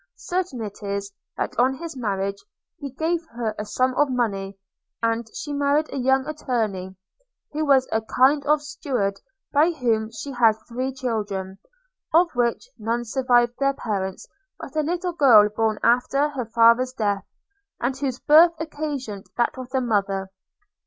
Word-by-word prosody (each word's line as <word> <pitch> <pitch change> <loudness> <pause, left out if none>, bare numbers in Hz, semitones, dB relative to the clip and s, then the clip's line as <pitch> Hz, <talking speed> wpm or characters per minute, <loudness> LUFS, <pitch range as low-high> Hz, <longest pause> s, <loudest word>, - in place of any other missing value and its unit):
Certain 350 -10 -3
it 205 0 -8
is, 200 0 -3 0.3
that - - -2
on 260 +2 +3
his 325 +1 -7
marriage 200 -4 -2 0.4
he 285 -3 -5
gave 325 +5 -1
her 230 -2 -2
a 210 - -3
sum 255 +4 0
of 290 +2 +2
money, 200 -6 -2 0.5
and 230 0 0
she 290 - -5
married 285 +2 +1
a - - -3
young 265 +1 +2
attorney, 220 -11 -3 0.6
who 305 +1 -2
was 275 -3 +4
a 220 - +1
kind 265 +6 +3
of 300 0 +3
steward, 250 -9 -2 0.3
by 305 +4 +5
whom 230 -9 0
she 225 +5 -7
had 235 -4 +4
three 255 +2 -3
children; 205 -7 -3 0.6
of 340 +1 +5
which 240 - 0
none 230 +2 -1
survived 240 0 +2
their 275 0 +2
parents 195 -4 -4 0.3
but - - -9
a 310 - +2
little 350 +3 -2
girl 245 -10 +7
born 215 0 0
after 250 +5 +3
her 265 -5 -4
father's 235 +3 +4
death; 205 -5 -1 0.6
and 255 +2 -1
whose 265 -3 -2
birth 330 +3 +6
occasioned 290 -10 -5
that 240 - +1
of 255 -1 -8
her 265 -1 +1
mother. 195 -5 -1
245 Hz, 160 wpm, -23 LUFS, 215-285 Hz, 0.6 s, girl